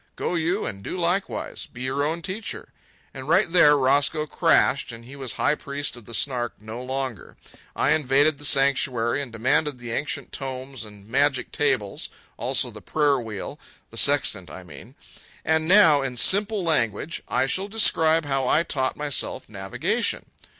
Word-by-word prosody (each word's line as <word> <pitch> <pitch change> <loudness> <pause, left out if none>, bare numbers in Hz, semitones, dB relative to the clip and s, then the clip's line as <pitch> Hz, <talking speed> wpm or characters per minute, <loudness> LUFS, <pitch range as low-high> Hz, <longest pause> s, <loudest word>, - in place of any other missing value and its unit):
Go - - -2
you 175 +4 0
and 100 -3 -5
do - - -5
likewise—be 175 -7 -2
your 130 +2 -1
own 165 +3 -2
teacher." 195 +5 -5 0.4
And 135 +2 -8
right 165 - +4
there 150 -4 +6
Roscoe 140 +3 +2
crashed, 150 -5 +2
and 115 0 -11
he 135 +3 -11
was 130 -5 -4
high 145 - +1
priest 140 -2 -3
of 120 -3 -13
the 115 - -4
Snark 120 -1 -1
no 110 +3 -8
longer. 130 -5 -5 0.4
I - - +2
invaded 145 0 +3
the - - -10
sanctuary 135 -2 +2
and 135 -4 -6
demanded 140 +5 0
the 120 -1 -7
ancient 145 +5 -3
tomes 130 -2 -6
and 105 -1 -14
magic 135 +2 +1
tables, 120 -9 -1 0.3
also - - 0
the - - -11
prayer 145 -3 +1
wheel—the 110 -5 -9
sextant, 110 - +2
I 90 +5 -9
mean. 75 -6 -13 0.5
And 160 0 +2
now, 170 -7 +6
in 130 -2 -4
simple 200 - +3
language. 155 - 0
I - - +1
shall 185 +9 -2
describe 165 -7 +3
how 135 -2 0
I 155 - +3
taught 130 -6 -2
myself 145 -2 -3
navigation. 95 -2 -2
140 Hz, 160 wpm, -24 LUFS, 120-155 Hz, 0.5 s, there